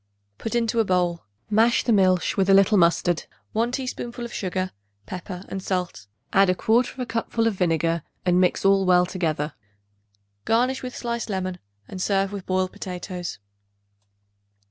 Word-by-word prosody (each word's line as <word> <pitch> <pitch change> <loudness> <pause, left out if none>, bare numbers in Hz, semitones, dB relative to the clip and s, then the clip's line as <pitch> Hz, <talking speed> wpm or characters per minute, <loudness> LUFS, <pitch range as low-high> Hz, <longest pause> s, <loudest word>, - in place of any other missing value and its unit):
Put 225 - -3
into 230 -1 +2
bowl; 180 - 0 0.2
mash 225 +3 +3
the 235 - +2
milch 185 -3 +3
with 195 0 +1
a 195 - +7
little 195 +2 +5
mustard, 170 -1 +3 0.3
1 230 +2 +1
teaspoonful 245 -2 -4
of 235 - -8
sugar, 185 -1 -2 0.3
pepper 180 0 -7
and 195 - -5
salt. 180 - -3 0.3
Add 195 -1 +5
1/4 240 +6 +1
cupful 230 0 -1
of 225 - +2
vinegar 165 -2 +1 0.2
and 180 0 +4
mix 180 +1 +1
all 195 0 +5
well 180 0 +5
together. 160 -5 -2 0.9
Garnish 250 +4 +1
with 250 -1 -6
sliced 235 -1 -3
lemon, 185 -2 -3 0.3
and 185 - -7
serve 195 0 +1
with 200 -2 -7
boiled 185 0 0
potatoes. 180 -1 -6
190 Hz, 145 wpm, -24 LUFS, 180-225 Hz, 0.9 s, a